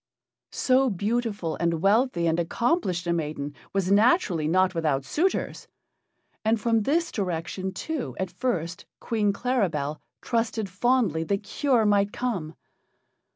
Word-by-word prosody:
So 260 Hz, 0 st, +3 dB
beautiful 205 Hz, -3 st, -1 dB
and 170 Hz, -1 st, 0 dB
wealthy 200 Hz, 0 st, +2 dB
and 165 Hz, 0 st, +1 dB
accomplished 180 Hz, -, 0 dB
a 170 Hz, -, +1 dB
maiden 150 Hz, -3 st, -3 dB, 0.2 s
was 195 Hz, -1 st, 0 dB
naturally 200 Hz, -, +3 dB
not 185 Hz, +3 st, +3 dB
without 150 Hz, -5 st, 0 dB
suitors; 350 Hz, -, -1 dB, 0.8 s
and 220 Hz, +1 st, +2 dB
from 225 Hz, +1 st, +2 dB
this 330 Hz, +9 st, +1 dB
direction, 185 Hz, -1 st, -3 dB
too, 300 Hz, +8 st, -4 dB
at 190 Hz, -1 st, -2 dB
first, 180 Hz, -4 st, -3 dB
Queen 215 Hz, -3 st, 0 dB
Claribel 185 Hz, -, -1 dB, 0.2 s
trusted 225 Hz, -3 st, -1 dB
fondly 200 Hz, -, +1 dB
that 200 Hz, +3 st, -1 dB
cure 245 Hz, +1 st, +1 dB
might 205 Hz, -1 st, +3 dB
come. 190 Hz, -12 st, -3 dB
200 Hz, 125 wpm, -26 LUFS, 170-240 Hz, 0.8 s, So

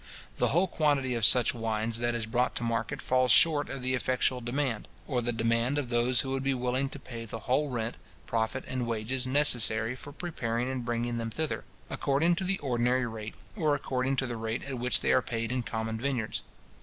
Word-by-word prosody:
The -, -, +2 dB
whole 175 Hz, +6 st, +3 dB
quantity 145 Hz, -6 st, +1 dB
of 115 Hz, -2 st, -2 dB
such 120 Hz, +2 st, +6 dB
wines 115 Hz, -1 st, -1 dB
that 120 Hz, 0 st, 0 dB
is 115 Hz, -2 st, -2 dB
brought 120 Hz, +3 st, 0 dB
to -, -, -2 dB
market 115 Hz, -2 st, -2 dB
falls 130 Hz, 0 st, +2 dB
short 150 Hz, +3 st, +5 dB
of 130 Hz, -, -6 dB
the 130 Hz, 0 st, 0 dB
effectual 130 Hz, 0 st, 0 dB
demand, 120 Hz, -2 st, -2 dB, 0.2 s
or 125 Hz, -4 st, -1 dB
the 120 Hz, 0 st, 0 dB
demand 115 Hz, +4 st, +1 dB
of 140 Hz, -4 st, -2 dB
those 120 Hz, +1 st, +3 dB
who 135 Hz, -, -4 dB
would 135 Hz, 0 st, -1 dB
be 135 Hz, 0 st, +1 dB
willing 125 Hz, +2 st, 0 dB
to 145 Hz, -, -8 dB
pay 115 Hz, -3 st, -8 dB
the 115 Hz, 0 st, -7 dB
whole 140 Hz, +5 st, +1 dB
rent, 115 Hz, -2 st, -3 dB, 0.3 s
profit, 115 Hz, +3 st, -1 dB
and 130 Hz, -2 st, -2 dB
wages, 120 Hz, +3 st, -1 dB
necessary 120 Hz, -4 st, +4 dB
for 145 Hz, +2 st, -10 dB
preparing 125 Hz, -7 st, -2 dB
and 130 Hz, -2 st, -3 dB
bringing 120 Hz, 0 st, -1 dB
them 115 Hz, 0 st, -3 dB
thither, 155 Hz, +7 st, -3 dB, 0.2 s
according 145 Hz, +5 st, +1 dB
to 190 Hz, -, -2 dB
the 190 Hz, +1 st, +1 dB
ordinary 125 Hz, -1 st, +1 dB
rate, 110 Hz, -2 st, -6 dB, 0.2 s
or 155 Hz, -7 st, +2 dB
according 135 Hz, -1 st, -1 dB
to 130 Hz, -, 0 dB
the 120 Hz, -2 st, -4 dB
rate 110 Hz, +1 st, -3 dB
at 135 Hz, -3 st, -5 dB
which 125 Hz, +1 st, +2 dB
they 65 Hz, -1 st, +2 dB
are 65 Hz, -, +4 dB
paid 115 Hz, 0 st, -3 dB
in 130 Hz, 0 st, 0 dB
common 110 Hz, -1 st, -3 dB
vineyards. 125 Hz, -5 st, -1 dB
125 Hz, 210 wpm, -29 LUFS, 115-135 Hz, 0.3 s, such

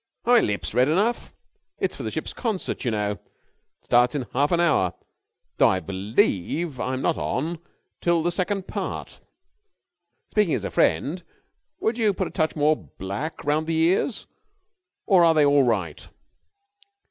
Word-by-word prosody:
"Are 240 Hz, -, +4 dB
my 240 Hz, -, +8 dB
lips 105 Hz, -, -2 dB
red 125 Hz, +4 st, +3 dB
enough? 205 Hz, +9 st, 0 dB, 0.4 s
It's -, -, -1 dB
for -, -, -8 dB
the -, -, -3 dB
ship's -, -, -5 dB
concert, 220 Hz, -6 st, -3 dB
you 125 Hz, -, 0 dB
know. 105 Hz, -2 st, -1 dB
It 105 Hz, -, -6 dB, 0.6 s
starts 125 Hz, +4 st, +3 dB
in 135 Hz, -4 st, -2 dB
half 140 Hz, +3 st, +1 dB
an 170 Hz, -, +2 dB
hour, 140 Hz, -, +2 dB, 0.6 s
though -, -, +5 dB
I 95 Hz, -, +1 dB
believe 105 Hz, -, -1 dB
I'm 130 Hz, +1 st, -2 dB
not -, -, +1 dB
on 160 Hz, +5 st, -2 dB, 0.4 s
till 170 Hz, -2 st, +2 dB
the 175 Hz, -, +1 dB
second 190 Hz, +2 st, -1 dB
part. -, -, -5 dB, 1.1 s
Speaking 210 Hz, -7 st, +2 dB
as -, -, -4 dB
a -, -, -4 dB
friend, 145 Hz, -, +1 dB, 0.6 s
would 225 Hz, +2 st, -1 dB
you 210 Hz, -4 st, +2 dB
put -, -, -1 dB
a -, -, -9 dB
touch 155 Hz, -2 st, 0 dB
more 155 Hz, 0 st, +3 dB
black 100 Hz, -, -6 dB
round 155 Hz, +2 st, +1 dB
the 165 Hz, -1 st, 0 dB
ears, 180 Hz, +8 st, +1 dB, 0.8 s
or 185 Hz, -5 st, +5 dB
are 165 Hz, -1 st, +5 dB
they 150 Hz, -2 st, +5 dB
all 140 Hz, -1 st, +4 dB
right?" 95 Hz, -10 st, -2 dB
155 Hz, 165 wpm, -24 LUFS, 120-175 Hz, 1.1 s, my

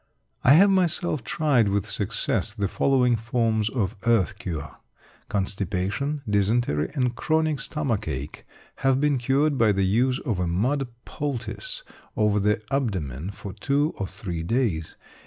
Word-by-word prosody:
I 130 Hz, -, +7 dB
have 195 Hz, +6 st, +7 dB
myself 175 Hz, -6 st, +1 dB
tried 135 Hz, -5 st, +2 dB
with 100 Hz, -1 st, 0 dB
success -, -, -1 dB
the 100 Hz, -1 st, 0 dB
following 125 Hz, +2 st, +2 dB
forms 115 Hz, -1 st, 0 dB
of 110 Hz, -8 st, -1 dB
earth 110 Hz, -3 st, +2 dB
cure. 75 Hz, -6 st, -5 dB, 0.5 s
Constipation, 100 Hz, -, -2 dB
dysentery, 100 Hz, -6 st, +1 dB
and 125 Hz, -3 st, 0 dB
chronic 155 Hz, 0 st, +1 dB
stomach 125 Hz, -9 st, -2 dB
ache 65 Hz, +3 st, -5 dB, 0.3 s
have 135 Hz, -1 st, +2 dB
been 145 Hz, -2 st, +2 dB
cured 135 Hz, +3 st, +1 dB
by 110 Hz, -2 st, +5 dB
the 95 Hz, -1 st, +1 dB
use 125 Hz, +7 st, +2 dB
of 115 Hz, -10 st, -2 dB
a 90 Hz, -, 0 dB
mud 125 Hz, +11 st, 0 dB, 0.2 s
poultice 145 Hz, -, -4 dB, 0.3 s
over 105 Hz, -1 st, +3 dB
the 105 Hz, +2 st, +1 dB
abdomen 90 Hz, -, -2 dB
for 100 Hz, -1 st, -8 dB
two 140 Hz, +8 st, 0 dB
or 95 Hz, -, -3 dB
three 90 Hz, -3 st, -5 dB
days. 85 Hz, -5 st, -1 dB
115 Hz, 140 wpm, -25 LUFS, 100-140 Hz, 0.5 s, I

